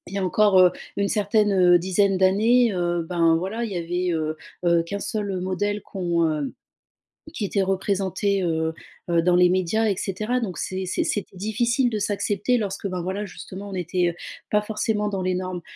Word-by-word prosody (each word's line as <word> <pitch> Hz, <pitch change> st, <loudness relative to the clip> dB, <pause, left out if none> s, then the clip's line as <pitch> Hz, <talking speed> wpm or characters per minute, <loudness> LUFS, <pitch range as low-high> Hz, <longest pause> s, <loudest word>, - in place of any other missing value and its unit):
y -, -, -1 dB
a -, -, -1 dB
encore, 205 Hz, +1 st, +3 dB
heu, 180 Hz, -, +6 dB, 0.2 s
une 200 Hz, 0 st, 0 dB
certaine, 210 Hz, 0 st, +2 dB
heu, 180 Hz, -2 st, +5 dB
dizaine 190 Hz, +2 st, +2 dB
d'années, 215 Hz, +5 st, +4 dB
heu, 175 Hz, -1 st, 0 dB
ben, 165 Hz, -2 st, +3 dB
voilà, 205 Hz, +7 st, -2 dB
il 210 Hz, -, -6 dB
y -, -, -5 dB
avait, 175 Hz, +1 st, -1 dB
heu 155 Hz, 0 st, -3 dB, 0.3 s
heu, 170 Hz, -1 st, +4 dB
qu'1 200 Hz, +4 st, -5 dB
seul 200 Hz, -4 st, -3 dB
modèle 205 Hz, +2 st, -1 dB
qu'on 175 Hz, -3 st, -1 dB
heu, 150 Hz, -2 st, -3 dB, 0.8 s
qui 225 Hz, -, -4 dB
était 200 Hz, 0 st, 0 dB
représenté, 195 Hz, 0 st, 0 dB
heu 160 Hz, -1 st, 0 dB, 0.4 s
heu, 170 Hz, -1 st, +3 dB
dans 175 Hz, +1 st, +3 dB
les 180 Hz, 0 st, +6 dB
médias 185 Hz, +5 st, +1 dB
et 195 Hz, -, +1 dB
cetera, 215 Hz, +6 st, -1 dB
donc 185 Hz, -7 st, -4 dB
c'est 190 Hz, 0 st, -3 dB
c'est 185 Hz, -, -1 dB
c'était 200 Hz, -2 st, -3 dB
difficile 235 Hz, +5 st, +1 dB
de 215 Hz, -, -2 dB
s'accepter 205 Hz, +4 st, 0 dB
lorsque, 200 Hz, -2 st, -3 dB
ben, 180 Hz, -2 st, -3 dB
voilà, 190 Hz, +4 st, -3 dB
justement, 195 Hz, +1 st, -9 dB
on -, -, -7 dB
n'était 175 Hz, -1 st, -1 dB, 0.4 s
pas 210 Hz, 0 st, +3 dB
forcément 210 Hz, 0 st, -1 dB
dans 195 Hz, -2 st, -3 dB
les 185 Hz, 0 st, 0 dB
normes 185 Hz, -1 st, -4 dB
190 Hz, 190 wpm, -24 LUFS, 180-210 Hz, 0.8 s, heu